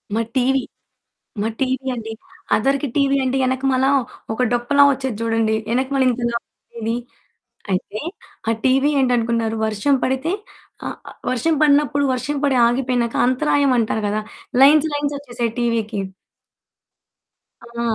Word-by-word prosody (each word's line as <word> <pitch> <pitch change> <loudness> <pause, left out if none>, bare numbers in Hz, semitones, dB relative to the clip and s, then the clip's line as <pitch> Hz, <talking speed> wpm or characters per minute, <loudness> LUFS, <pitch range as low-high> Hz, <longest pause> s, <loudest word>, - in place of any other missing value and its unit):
మా 230 - +2
టీవీ 265 +1 +2 0.8
మా 220 - 0
టీవీ 260 0 -1
అండి. 225 -1 -6 0.4
అదవరికి 275 +5 +1
టీవీ 275 -1 +3
అంటే 260 +1 0
వెనక 260 +1 -1
మల్ల 260 +1 +2 0.5
ఒక 250 - 0
డొప్పలా 245 +4 +4
వచ్చేది 265 -5 -3
చూడండి. 225 -1 +1
వెనక 260 +3 +1
మళ్ళీ 265 -1 +3
ఇంత 245 +1 -5
లావుగా 235 0 -8
ఉండేది. 225 +1 -1 0.8
అయితే 200 +3 -2 0.5
ఆ - - +4
టీవీ 270 +3 +3
ఏంటి 250 -1 +2
అనుకున్నారు. 230 -1 0
వర్షం 220 +7 +1
పడితే 265 +7 0 0.5
ఆహ్, - - -5 0.3
వర్షం 310 +6 +1
పడినప్పుడు 285 -1 +3
వర్షం 285 +4 -3
పడి 270 -2 +2
ఆగిపోయినాక 245 -1 0
అంతరాయం 280 +1 +2
అంటారు 220 -1 0
కదా. 215 +1 -1 0.4
లైన్స్ 305 +2 +6
లైన్స్ 290 0 -1
వచ్చేసాయి 240 -4 -3
టీవీ‌కి. 225 -3 -1 1.7
ఆ! 235 0 -6
255 Hz, 135 wpm, -20 LUFS, 230-275 Hz, 1.7 s, లైన్స్